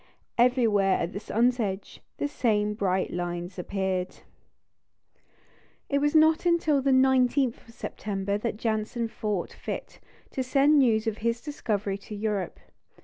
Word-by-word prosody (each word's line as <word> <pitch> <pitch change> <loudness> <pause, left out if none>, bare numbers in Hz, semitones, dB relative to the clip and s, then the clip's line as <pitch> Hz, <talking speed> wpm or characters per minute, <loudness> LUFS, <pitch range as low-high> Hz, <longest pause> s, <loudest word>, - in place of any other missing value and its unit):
Everywhere 225 -6 +4
at 170 - -3
the 200 - -4
sun's 240 +4 +1
edge 195 -3 -4 0.2
the - - -1
same 210 -7 +1
bright 190 -3 0
lines 175 +1 -4
appeared. 190 -1 -2 1.7
It 280 - +2
was 295 +2 +1
not 315 +1 +5
until 330 -5 +2
the 275 - +1
19th 260 -1 +3
of - - -14
September 200 -1 -3
that 220 -1 -3
Janssen 225 +1 -1
thought 210 -4 -3
fit - - -6 0.3
to 265 - -2
send 280 +3 +4
news 225 -4 +3
of 220 -1 -2
his 235 +1 0
discovery 210 -8 -3
to 210 +1 -9
Europe. 205 -3 -2
220 Hz, 140 wpm, -27 LUFS, 200-260 Hz, 1.7 s, not